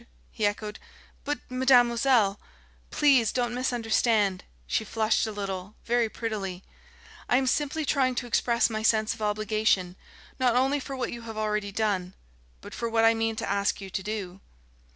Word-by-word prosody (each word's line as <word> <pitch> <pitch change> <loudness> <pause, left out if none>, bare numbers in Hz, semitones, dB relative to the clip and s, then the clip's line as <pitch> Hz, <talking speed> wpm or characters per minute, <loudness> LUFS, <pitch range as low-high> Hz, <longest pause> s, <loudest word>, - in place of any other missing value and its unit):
he 215 -2 0
echoed. 210 0 -4 0.4
"But, 290 +1 -3
mademoiselle 245 -4 +3 0.3
!" - - -32
"Please 265 -7 +5
don't 240 -1 -1
misunderstand." 225 -5 +1 0.2
She 220 - 0
flushed 220 +1 +1
a - - -4
little, 195 -1 -5
very 240 -1 +1
prettily. 195 -5 -4 0.7
"I 245 - +4
am 265 - +1
simply 295 +4 0
trying 260 -3 +1
to 245 - -2
express 235 0 +2
my 220 -1 -3
sense 220 0 +2
of 225 - -12
obligation, 210 -3 0 0.4
not 250 -2 +3
only 270 +3 +2
for 275 0 -6
what 255 - -3
you 235 - -7
have 220 - -7
already 210 -1 -1
done, 195 -3 -1 0.5
but - - -10
for 235 - -3
what 225 0 +3
I 225 - +6
mean 225 0 -1
to - - -4
ask 200 0 0
you 195 -1 -8
to 190 - -2
do." 195 -2 -5
225 Hz, 170 wpm, -27 LUFS, 205-245 Hz, 0.7 s, I